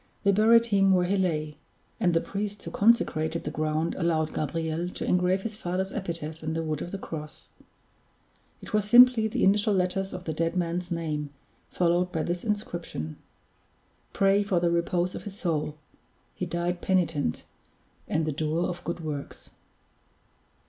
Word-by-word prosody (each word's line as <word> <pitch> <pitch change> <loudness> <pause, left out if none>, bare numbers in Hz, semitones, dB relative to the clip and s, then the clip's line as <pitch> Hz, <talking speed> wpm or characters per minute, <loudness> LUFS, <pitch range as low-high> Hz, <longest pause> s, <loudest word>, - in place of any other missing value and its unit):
They 200 - +5
buried 225 +3 +5
him 195 -3 +3
where 180 -1 +3
he 190 +3 +1
lay; 155 -5 -1 0.4
and 175 -2 +2
the 165 - +3
priest 205 0 -4
who - - -6
consecrated 170 -7 +2
the - - -4
ground 155 +1 -1
allowed 160 -3 0
Gabriel 160 +3 -2
to - - -5
engrave 180 +1 +2
his 220 -2 -4
father's 190 0 -2
epitaph 165 -5 -4
in 160 0 -3
the 165 0 -2
wood 155 -2 -3
of - - -4
the 195 - -4
cross. 155 -5 -8 1.1
It - - -10
was 210 -1 +3
simply 240 0 +7
the 215 - -1
initial 205 +1 +3
letters 190 +1 0
of 180 -1 -6
the 160 - -3
dead 165 +3 -1
man's 175 0 -1
name, 155 -3 -2 0.4
followed 175 +1 +1
by 160 - -1
this 175 0 -2
inscription: 175 - -4 0.9
"Pray 195 +1 +3
for 195 -3 +1
the 170 0 +1
repose 175 +1 0
of - - -7
his 200 -1 -7
soul: 155 -5 -2 0.6
he 180 - -4
died 175 +1 -2
penitent, 165 - 0 0.6
and 155 0 0
the 155 - -1
doer 155 +3 -1
of 175 0 -6
good 170 0 -4
works." 150 -3 -6
175 Hz, 165 wpm, -27 LUFS, 160-195 Hz, 1.1 s, simply